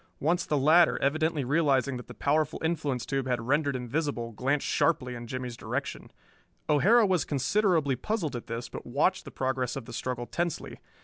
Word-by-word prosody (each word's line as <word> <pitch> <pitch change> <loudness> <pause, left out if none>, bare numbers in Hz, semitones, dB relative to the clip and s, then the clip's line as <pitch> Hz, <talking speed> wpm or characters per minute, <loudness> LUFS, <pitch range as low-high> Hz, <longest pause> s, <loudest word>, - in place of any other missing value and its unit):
Once 170 +4 +1
the 150 - +1
latter, 155 +5 +5
evidently 155 +1 +1
realizing 140 -2 +2
that 125 - -8
the - - -10
powerful 155 +2 0
influence 150 -6 -1
tube 135 -1 -2
had 125 -1 0
rendered 140 +4 +1
him 125 -1 -4
visible, 135 -4 -2
glanced 135 +6 -1
sharply 130 -7 +1
in 120 -1 -7
Jimmie's 125 -1 -5
direction. - - -4 0.6
O'Hara 215 +10 +5
was 185 -6 +2
considerably 155 0 +1
puzzled 185 - -2
at 120 - -6
this, 115 +1 -4
but - - -8
watched 150 +9 0
the - - -7
progress 130 -2 -1
of 135 -4 -6
the 120 - -10
struggle 120 0 -3
tensely. 170 +5 -3
140 Hz, 180 wpm, -28 LUFS, 125-160 Hz, 0.6 s, latter